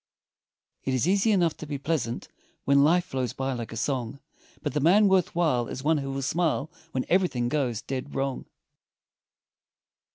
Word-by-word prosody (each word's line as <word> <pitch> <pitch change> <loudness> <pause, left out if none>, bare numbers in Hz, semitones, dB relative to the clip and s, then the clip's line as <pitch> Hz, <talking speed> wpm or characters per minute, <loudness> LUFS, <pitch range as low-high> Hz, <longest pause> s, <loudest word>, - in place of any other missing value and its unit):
It 130 - 0
is 130 +5 +1
easy 200 +4 +3
enough 175 -5 +2
to 155 - -8
be 145 -1 -3
pleasant, 140 -5 -2 0.4
When 140 0 +5
life 175 +4 +4
flows 130 -6 -3
by 135 0 -2
like 120 -2 -5
a 115 - -6
song, 130 +1 -2 0.4
But 145 - -2
the 150 - +1
man 190 +8 +5
worth 190 -4 +2
while 150 -9 +2
is 130 - -6
one 155 +1 +3
who 135 -1 -4
will 135 0 -3
smile, 160 0 0 0.2
When 130 - -2
everything 170 -10 +1
goes 130 -7 -1
dead 135 +1 -5
wrong. 135 -1 -2
140 Hz, 170 wpm, -27 LUFS, 130-165 Hz, 0.4 s, When